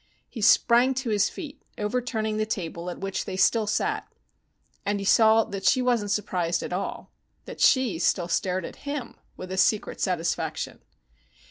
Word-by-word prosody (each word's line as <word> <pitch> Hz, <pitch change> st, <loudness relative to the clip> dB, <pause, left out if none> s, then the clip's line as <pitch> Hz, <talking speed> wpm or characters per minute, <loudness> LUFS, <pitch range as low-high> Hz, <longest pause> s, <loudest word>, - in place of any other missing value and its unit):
He 230 Hz, -, -8 dB
sprang 240 Hz, +5 st, +5 dB
to 255 Hz, -3 st, -2 dB
his 205 Hz, -1 st, +2 dB
feet, 295 Hz, -5 st, -9 dB, 0.2 s
overturning 220 Hz, -1 st, -2 dB
the 215 Hz, -, 0 dB
table 170 Hz, -4 st, -4 dB
at 175 Hz, -, -6 dB
which 195 Hz, 0 st, -3 dB
they 185 Hz, -, -5 dB
still 220 Hz, +2 st, +3 dB
sat. 425 Hz, -, -1 dB, 0.7 s
And 205 Hz, 0 st, 0 dB
he 200 Hz, -, -4 dB
saw 220 Hz, +2 st, +5 dB
that 195 Hz, -2 st, -7 dB
she 255 Hz, -, +4 dB
wasn't 240 Hz, -5 st, +1 dB
surprised 180 Hz, -5 st, -1 dB
at -, -, -5 dB
all, 185 Hz, -, -4 dB, 0.3 s
that -, -, -9 dB
she 250 Hz, -, +3 dB
still 175 Hz, 0 st, +1 dB
stared 180 Hz, 0 st, -1 dB
at -, -, -9 dB
him 285 Hz, -3 st, -5 dB, 0.2 s
with 185 Hz, 0 st, -8 dB
a 190 Hz, -, -3 dB
secret 205 Hz, +3 st, +1 dB
satisfaction. 170 Hz, -3 st, -2 dB
210 Hz, 165 wpm, -26 LUFS, 185-235 Hz, 0.7 s, sprang